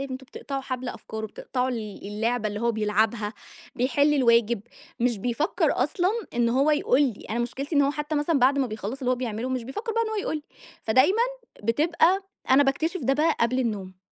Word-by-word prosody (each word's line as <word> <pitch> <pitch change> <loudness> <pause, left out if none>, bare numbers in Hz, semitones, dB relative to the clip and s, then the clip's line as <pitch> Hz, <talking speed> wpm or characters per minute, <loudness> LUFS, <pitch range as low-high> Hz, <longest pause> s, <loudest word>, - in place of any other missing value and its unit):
أنتم 265 -1 -6
بتقطعوا 275 +1 -5
حَبل 255 -1 -4
أفكاره، 220 -2 -6
بتقطعوا 250 +4 -3
ال 215 -6 -5
اللعبة 220 +2 -1
اللي 205 0 -5
هو 235 0 +1
بيلعبها، 215 0 0 0.4
بيحِل 285 +4 +2
الواجب، 235 -4 +3 0.4
مش 240 -2 +1
بيفكّر 245 - +1
أصلًا 365 0 +1 0.2
إن 235 -1 +2
هو 270 +5 +3
يقول 295 -2 +3
لي. 245 -8 -2
أنا 225 - -1
مشكلتي 270 +6 -3
إن 285 - +6
هو 280 - +3
حتّى 295 +1 -3
مثلًا 295 +1 +2
بعد 270 +2 +4
ما 270 - +2
بيخلّص 215 +2 -5
اللي 255 -2 -1
هو - - +4
بيعمله، 240 -1 -3
مش 255 -1 -2
بيفكّر 420 - -4
بقى 460 - +2
إن 450 - -2
هو 440 - -3
يقول 390 -6 -1
لي، 300 - -7 0.4
فدايمًا 285 - +4 0.4
بتبقى 325 - +3 0.3
أنا 265 +2 +7
باكتشف 320 +6 0
ده 270 - +3
بقى 310 +3 +2
قبل 235 +2 +2
النوم. 200 -7 -3
255 Hz, 195 wpm, -26 LUFS, 230-290 Hz, 0.4 s, أنا